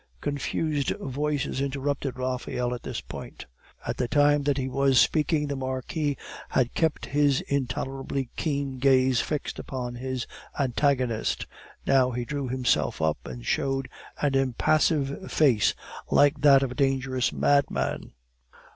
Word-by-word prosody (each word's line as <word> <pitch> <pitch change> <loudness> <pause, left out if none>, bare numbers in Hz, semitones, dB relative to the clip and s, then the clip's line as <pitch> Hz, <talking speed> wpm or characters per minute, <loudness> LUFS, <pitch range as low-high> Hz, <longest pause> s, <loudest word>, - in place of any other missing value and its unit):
Confused 145 - -1
voices 140 0 -2
interrupted 140 -1 -2
Raphael 125 -1 -2
at 120 - -5
this - - -5
point. - - -9 0.4
All - - -1
the 125 - -1
time 145 +1 +4
that 145 -1 +2
he 130 -1 -1
was 135 0 +3
speaking, 155 -1 +2
the 140 -1 -3
Marquis 135 +2 -2 0.3
had 125 -2 +1
kept 160 -2 0
his 145 -1 +2
intolerably 135 0 -3
keen 140 -4 -2
gaze 130 -2 +4
fixed 150 -2 -3
upon 125 -3 -5
his 130 0 -4 0.3
antagonist; 130 -3 +1 0.4
now 130 -2 +4
he 120 -1 -3
drew 140 -2 -3
himself 125 0 0
up 80 -1 +1
and - - -8
showed 135 -1 0 0.3
an 145 -2 +1
impassive 140 +4 +1
face, 130 -9 +3 0.3
like 145 0 +4
that 140 -2 +7
of 130 - -2
a - - -4
dangerous 130 -2 +1
madman. 140 -1 +1
135 Hz, 135 wpm, -26 LUFS, 130-145 Hz, 0.4 s, that